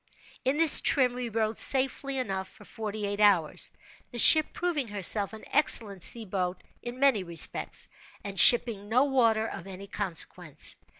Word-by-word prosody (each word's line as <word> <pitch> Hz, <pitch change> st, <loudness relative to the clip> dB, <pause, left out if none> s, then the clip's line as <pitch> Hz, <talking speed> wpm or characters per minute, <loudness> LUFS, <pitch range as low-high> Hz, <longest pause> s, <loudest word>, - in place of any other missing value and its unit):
In 265 Hz, +3 st, -2 dB
this 325 Hz, -2 st, +4 dB
trim 255 Hz, -4 st, 0 dB
we 245 Hz, -1 st, -7 dB
rode 220 Hz, 0 st, -4 dB
safely 270 Hz, +1 st, -1 dB
enough 195 Hz, -7 st, -5 dB
for 205 Hz, -, -20 dB
forty 215 Hz, -1 st, -8 dB
eight 205 Hz, 0 st, -6 dB
hours—the 200 Hz, +3 st, -3 dB
ship 310 Hz, +6 st, +8 dB
proving 325 Hz, -8 st, -5 dB
herself 205 Hz, 0 st, +2 dB
an 220 Hz, -1 st, -14 dB
excellent 215 Hz, -9 st, +2 dB
sea 230 Hz, +5 st, +3 dB
boat 185 Hz, -2 st, -6 dB, 0.2 s
in 240 Hz, +1 st, -10 dB
many 265 Hz, -8 st, 0 dB
respects, 170 Hz, -2 st, +3 dB, 0.4 s
and 200 Hz, -1 st, -7 dB
shipping 225 Hz, -4 st, +3 dB
no 250 Hz, +4 st, +1 dB
water 230 Hz, -6 st, -1 dB
of 210 Hz, -, -10 dB
any 195 Hz, 0 st, -11 dB
consequence. 180 Hz, -5 st, -6 dB
220 Hz, 155 wpm, -25 LUFS, 195-255 Hz, 0.4 s, ship